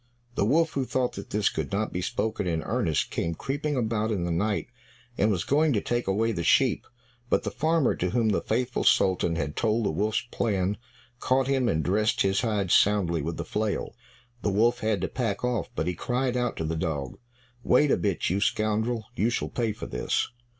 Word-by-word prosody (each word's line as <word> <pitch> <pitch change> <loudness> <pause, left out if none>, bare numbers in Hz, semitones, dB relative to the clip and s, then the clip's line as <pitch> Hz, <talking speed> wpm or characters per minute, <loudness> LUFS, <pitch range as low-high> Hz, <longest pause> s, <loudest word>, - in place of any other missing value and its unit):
The 100 - +1
wolf, 160 +8 +3
who 135 - -1
thought 130 -1 -1
that 100 - -8
this 105 0 +1
could - - -4
not 105 +2 -1
be 90 - -2
spoken 105 +1 -2
in 80 -2 -1
earnest, 110 - 0
came 85 0 -2
creeping 145 - -2
about 110 -2 0
in 95 -5 -1
the 85 - -1
night 100 +5 0 0.5
and 105 - +2
was 95 -5 0
going 150 +1 +2
to 105 - +2
take 120 +2 -2
away 110 +4 +1
the 85 -6 -3
sheep. - - +3 0.4
But - - +2
the - - -3
farmer, 155 +1 +2
to 90 - 0
whom 115 +1 +1
the 105 - +1
faithful 120 +2 -1
Sultan 90 -3 +3
had 75 -2 -3
told 110 0 +1
the - - +1
wolf's 105 +7 0
plan, 100 -3 0 0.4
caught 130 +2 +2
him 130 -2 +1
and 80 -1 0
dressed 105 +3 +2
his 95 0 +2
hide 105 -6 -1
soundly 95 -6 +3
with 80 +3 -4
the - - -4
flail. 105 -1 -2 0.5
The - - 0
wolf 115 +5 +2
had 110 -5 0
to - - 0
pack 115 -5 -2
off, 125 -6 -1
but - - -1
he 90 - -1
cried 125 +7 -1
out 125 -1 -1
to - - -2
the 80 +1 -2
dog, 80 -5 -3 0.4
"Wait 135 +4 +4
a - - +5
bit, 100 -4 -1
you 95 +3 0
scoundrel, 110 +1 0
you 110 - +2
shall 120 - -2
pay 115 -3 -1
for 105 - -7
this." 60 - -1
110 Hz, 210 wpm, -27 LUFS, 95-120 Hz, 0.5 s, a